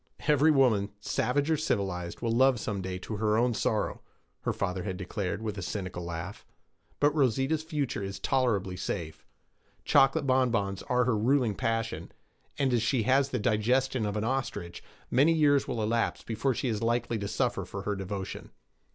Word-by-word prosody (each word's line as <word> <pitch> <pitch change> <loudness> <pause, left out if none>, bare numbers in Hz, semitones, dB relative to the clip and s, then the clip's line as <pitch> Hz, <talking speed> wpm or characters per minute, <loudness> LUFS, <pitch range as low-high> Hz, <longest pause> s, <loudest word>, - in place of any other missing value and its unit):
'Every 150 +1 +4
woman, 125 -9 +3
savage 140 +8 0
or 160 - +3
civilized, 95 - -2
will 115 -1 0
love 130 +1 +4
some 105 -2 -3
day 95 0 -4
to 105 +4 -6
her 105 0 +2
own 120 +1 +2
sorrow,' - - -1 0.4
her - - -1
father 95 -1 -2
had 95 -1 -4
declared, 100 +2 -3
with 105 -3 -3
a - - -4
cynical 90 -1 -4
laugh. 85 +3 -6 0.6
'But 145 0 +3
Rosita's 135 +2 +1
future 150 -8 -2
is 95 0 -4
tolerably 100 -6 0
safe. 80 -4 -5 0.6
Chocolate 135 +3 +4
bonbons 115 -7 +1
are 125 0 +3
her 125 -2 +1
ruling 120 +1 +2
passion, 115 +2 -2 0.5
and 135 -3 +1
as 120 - +3
she 115 +1 +1
has 135 +4 +3
the 130 - -1
digestion 120 +2 +1
of 105 +1 -2
an 105 - -1
ostrich, 115 -8 -3 0.3
many 145 +6 +5
years 145 -3 +3
will 115 - -2
elapse 115 +2 0
before 115 +3 -1
she 130 - -2
is 110 -3 -1
likely 115 0 0
to 100 - -3
suffer - - -1
for - - -7
her 105 - -1
devotion!' 95 0 -5
115 Hz, 175 wpm, -29 LUFS, 100-130 Hz, 0.6 s, many